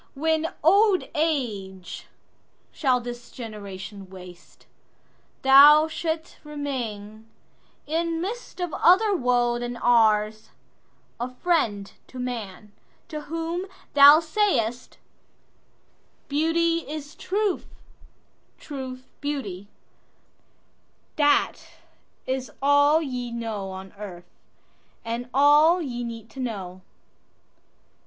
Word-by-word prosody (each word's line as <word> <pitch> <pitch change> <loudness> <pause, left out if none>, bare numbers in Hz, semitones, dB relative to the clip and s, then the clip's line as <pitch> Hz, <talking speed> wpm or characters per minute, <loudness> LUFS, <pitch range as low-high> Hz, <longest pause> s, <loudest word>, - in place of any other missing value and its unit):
When 320 +2 0
old 395 +3 +4
age 215 - -3 0.6
shall 260 -4 +1
this 240 0 -8
generation 200 -4 -9
waste, 180 -2 -14 0.8
Thou 290 +3 +8
shalt 320 0 -4
remain, 225 -8 -6 0.6
in 330 +2 -1
midst 430 +5 -6
of 355 -4 -3
other 395 +5 +4
woeThan 245 -5 0
ours, 215 -2 +2 0.7
a 245 +2 -3
friend 250 - -1
to 260 - -12
man, 225 -5 -6 0.4
to 305 -1 -5
whom 330 +3 -3 0.3
thou 285 +2 +9
say'st,"Beauty 310 - -1 1.9
is 300 0 -6
truth, 400 +3 -2 0.9
truth 260 -3 -8
beauty,"—that 205 -10 -4 2.6
is 260 -2 -3
allYe 285 -3 +2
know 225 -4 -4
on 190 0 -9
earth, 175 -4 -9 0.7
and 235 +2 -4
all 295 +6 +5
ye 245 -7 -4
need 230 -1 -8
to 270 - -11
know. 190 -7 -5
255 Hz, 85 wpm, -25 LUFS, 220-310 Hz, 2.6 s, thou